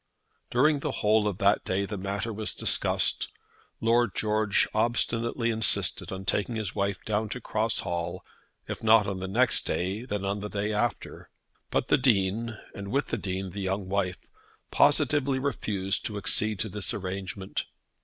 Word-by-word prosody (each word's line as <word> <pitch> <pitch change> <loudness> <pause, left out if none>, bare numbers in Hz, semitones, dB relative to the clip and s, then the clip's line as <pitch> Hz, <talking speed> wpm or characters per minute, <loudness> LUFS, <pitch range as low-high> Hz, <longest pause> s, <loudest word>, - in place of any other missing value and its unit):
During 145 +4 +3
the 145 -1 -2
whole 105 0 +4
of 100 -3 -2
that 100 +1 +3
day 95 +2 0
the 105 - -5
matter 100 +4 -3
was 105 0 -3
discussed. - - +1 0.5
Lord 115 -2 +2
George 110 -1 +2
obstinately 115 +1 +1
insisted 110 0 0
on 95 0 -5
taking 105 +5 0
his 110 -3 -2
wife 100 -1 0
down 105 0 0
to 125 - -4
Cross 110 0 -1
Hall, 85 -1 -3 0.4
if - - -5
not 110 -1 +6
on 100 -2 -3
the 95 - -4
next 120 +6 +3
day, 95 +6 -1
then 105 -6 -3
on 100 +1 -1
the 105 +1 -5
day 105 +1 -1
after. 105 +1 -2 0.4
But - - 0
the - - +5
Dean, 110 -2 +1 0.2
and 100 0 -7
with 140 +8 0
the - - -1
Dean 95 -1 -3
the 100 - -5
young 95 0 -2
wife, 95 -2 0 0.5
positively 140 -2 +3
refused 105 -8 -1
to 105 - -5
accede 105 +2 0
to 110 - -2
this 105 0 -1
arrangement. 95 0 -4
105 Hz, 165 wpm, -28 LUFS, 95-115 Hz, 0.5 s, not